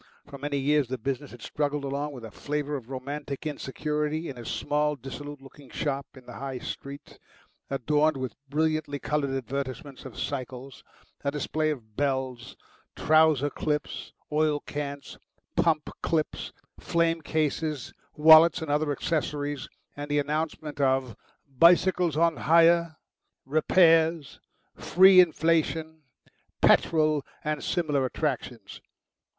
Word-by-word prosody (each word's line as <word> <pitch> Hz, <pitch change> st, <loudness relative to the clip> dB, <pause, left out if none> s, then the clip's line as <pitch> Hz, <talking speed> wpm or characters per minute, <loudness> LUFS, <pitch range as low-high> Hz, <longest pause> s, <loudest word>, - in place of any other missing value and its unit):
For 140 Hz, -1 st, -11 dB
many 145 Hz, 0 st, -2 dB
years 145 Hz, 0 st, +2 dB
the 130 Hz, +2 st, -3 dB
business 135 Hz, +4 st, -4 dB
had 120 Hz, -2 st, -13 dB
struggled 145 Hz, -1 st, -2 dB
along 140 Hz, +2 st, -3 dB
with 125 Hz, -4 st, -9 dB
a 110 Hz, -, -10 dB
flavour 150 Hz, +5 st, -3 dB
of 125 Hz, -3 st, -7 dB
romantic 140 Hz, +2 st, -6 dB
insecurity 150 Hz, +2 st, -3 dB
in 135 Hz, -, -7 dB
a -, -, -7 dB
small, 150 Hz, +8 st, -1 dB
dissolute 145 Hz, +2 st, -8 dB
looking 135 Hz, 0 st, -15 dB
shop 140 Hz, -2 st, -3 dB
in 130 Hz, -2 st, -14 dB
the -, -, -10 dB
High 135 Hz, -1 st, -4 dB
Street, 140 Hz, +3 st, -8 dB, 0.5 s
adorned 150 Hz, +3 st, +1 dB
with 130 Hz, -2 st, -4 dB, 0.2 s
brilliantly 155 Hz, 0 st, 0 dB
coloured 145 Hz, 0 st, -1 dB
advertisements 135 Hz, +2 st, -5 dB
of 130 Hz, -, -10 dB
cycles, 130 Hz, -2 st, -5 dB, 0.4 s
a 140 Hz, -, +1 dB
display 155 Hz, +2 st, -1 dB
of 115 Hz, -8 st, -6 dB
bells, 130 Hz, -3 st, -2 dB, 0.4 s
trouser 155 Hz, -3 st, +3 dB
clips, 150 Hz, -1 st, -3 dB, 0.2 s
oil 150 Hz, -1 st, +2 dB
cans, 140 Hz, -1 st, -6 dB, 0.4 s
pump 155 Hz, -3 st, +2 dB
clips, 155 Hz, -2 st, -1 dB, 0.3 s
frame 165 Hz, -1 st, +1 dB
cases, 155 Hz, -2 st, -2 dB, 0.2 s
wallets, 160 Hz, +2 st, +7 dB
and 155 Hz, -, -3 dB
other 150 Hz, 0 st, +1 dB
accessories, 145 Hz, -2 st, -2 dB, 0.3 s
and 145 Hz, 0 st, -6 dB
the 145 Hz, -, +1 dB
announcement 150 Hz, 0 st, -2 dB
of 130 Hz, -4 st, +1 dB, 0.3 s
"Bicycles 170 Hz, +3 st, +4 dB
on 165 Hz, 0 st, +2 dB
Hire," 170 Hz, 0 st, +4 dB, 0.5 s
"Repairs," 160 Hz, +1 st, +3 dB, 0.3 s
"Free 190 Hz, +1 st, +6 dB
inflation," 160 Hz, -1 st, +2 dB, 0.6 s
"Petrol," 155 Hz, -3 st, +3 dB, 0.2 s
and 155 Hz, -1 st, -2 dB
similar 150 Hz, -6 st, 0 dB
attractions. 125 Hz, -6 st, -4 dB
145 Hz, 125 wpm, -27 LUFS, 135-155 Hz, 0.6 s, wallets